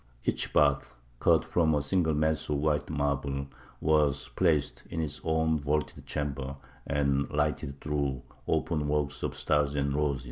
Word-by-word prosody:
Each - - 0
bath, 70 -3 +2 0.2
cut 80 -1 +4
from 80 -1 +2
a 75 - +1
single 80 0 +2
mass 80 +1 0
of 75 - +1
white 75 0 0
marble, 70 -2 -1 0.3
was 75 -2 +2
placed 80 -6 +1
in 80 - -4
its 80 -3 -2
own 80 -1 +1
vaulted 75 +1 -2
chamber, 70 -2 -3 0.3
and 70 -1 +1
lighted 75 -2 -1
through 70 -4 -2 0.2
openwork 75 -2 0
of - - -2
stars 75 -1 +1
and 70 -1 0
roses. 70 -2 +1
75 Hz, 145 wpm, -29 LUFS, 70-75 Hz, 0.3 s, cut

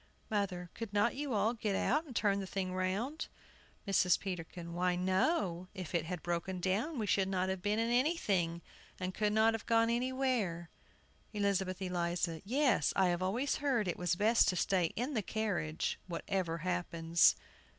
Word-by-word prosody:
MOTHER. 185 -4 -2
Could 225 -3 -6
not 210 +3 +3
you 285 0 -3
all 210 +3 +2
get 215 -4 -2
out 300 +10 +1
and 260 -6 -11
turn 200 -2 +2
the 195 - -4
thing 185 -1 -3
round? 195 +11 -2 0.6
MRS. 185 -2 +3
PETERKIN. 170 -2 -6
Why, 180 +1 +1
no; 185 - +1
if 185 -4 -6
it 165 -2 +1
had 175 -1 -5
broken 175 +2 -2
down 210 - -1
we 220 - -1
should 195 -1 +2
not 185 -1 0
have 190 -1 -2
been 205 +3 0
in 230 +1 +1
anything, 200 - +1 0.4
and 185 0 -3
could 210 +1 +1
not 220 +1 +4
have 225 - -5
gone 230 0 +3
anywhere. 240 -9 -1 0.6
ELIZABETH 195 -2 0
ELIZA. 175 -2 -1
Yes, 255 - +2
I 190 -2 +4
have 175 0 0
always 235 +10 0
heard 260 -8 +1
it 175 - -2
was 180 -1 +1
best 220 +5 +4
to 185 - +2
stay 180 0 +2
in 250 +6 -2
the 225 - +1
carriage, 190 -7 -2
whatever 170 -1 -2
happens. 170 -2 +3
190 Hz, 170 wpm, -34 LUFS, 180-225 Hz, 0.6 s, not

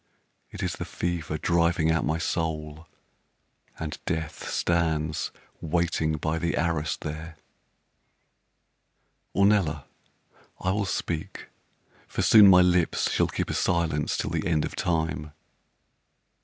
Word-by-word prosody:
It - - -7
is - - -1
the - - -5
fever 85 -3 -3
driving 85 -1 +2
out 80 - +1
my 80 +1 0
soul, 80 -1 -3 0.9
And 80 -2 -5
Death 80 -1 -3
stands 80 -2 0 0.3
waiting 80 -1 0
by 80 +1 -1
the 85 0 -1
arras 80 -4 0
there. 80 +1 -7 2.0
Ornella, 100 -7 +3 0.8
I 95 - 0
will 100 +1 0
speak, 85 -4 -4 0.6
for - - -2
soon 105 -2 +8
my 90 -1 +8
lips 90 -2 +2
Shall - - +2
keep - - -3
a - - -2
silence 80 -4 0
till 75 - -2
the 80 0 -1
end 80 -3 +1
of - - -6
time. 80 -3 -1
80 Hz, 120 wpm, -26 LUFS, 75-85 Hz, 2.0 s, soon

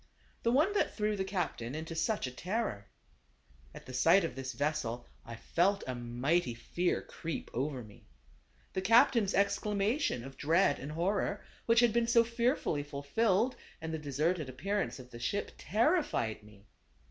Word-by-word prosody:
The 235 - +2
one 305 +11 +3
that 410 - +1
threw 210 -1 +1
the 190 - -1
captain 175 - -3
into 160 +1 -5
such 165 +5 0
a 130 - -4
terror. 180 - -3 0.8
At - - -12
the 130 - -9
sight 165 +9 +5
of 165 - -2
this 130 +1 -5
vessel 145 -5 -2 0.2
I 115 - -8
felt 190 - +1
a 130 - -3
mighty 120 +4 0
fear 175 +9 -1
creep 165 -1 -6
over 130 0 -2
me. 105 -2 -16 0.7
The 190 - -1
cap 225 +5 +6
tain's 215 -6 +1
exclamation 200 - +1
of 135 0 -10
dread 160 +1 +3
and 145 +3 -6
horror, 195 +4 -1 0.2
which 230 0 +6
had 240 -3 +4
been 235 0 +2
so 235 0 +5
fearfully 235 - 0
fulfilled, 190 - +1 0.2
and 160 0 -5
the 160 - -2
deserted 150 +2 -1
appearance 195 +11 -2
of 125 -1 -12
the 120 - -9
ship, 200 +11 -2
terrified 230 - +1
me. 105 -1 -18
165 Hz, 165 wpm, -32 LUFS, 130-210 Hz, 0.8 s, cap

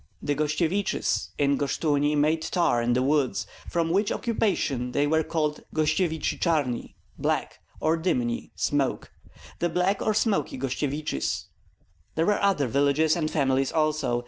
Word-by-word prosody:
The 145 - -1
Gostsyeviches 155 +6 0
in 140 -1 +2
Goshchuni 145 0 +1
made 155 +2 +2
tar 160 -7 +1
in 120 +1 +1
the 125 +1 +2
woods, 140 -1 +1 0.2
from 165 -1 0
which 200 +4 +2
occupation 145 - -1
they 145 - +2
were 160 +2 +2
called 155 -1 -1
Gostsyevichi 155 +1 0
Charni 145 -8 0 0.2
(Black) - - -1 0.2
or 160 +1 +2
Dymni 125 -9 -1
(Smoky), 140 -2 0 0.5
the 175 - +1
Black 180 +4 +1
or 215 - +1
Smoky 200 - +1
Gostsyeviches. 135 - -2 0.7
There 160 - +2
were 210 +2 +2
other 195 -8 +2
villages 140 +5 +2
and 155 -3 -1
families 135 -3 +1
also. 155 -6 +1
150 Hz, 140 wpm, -26 LUFS, 140-165 Hz, 0.7 s, in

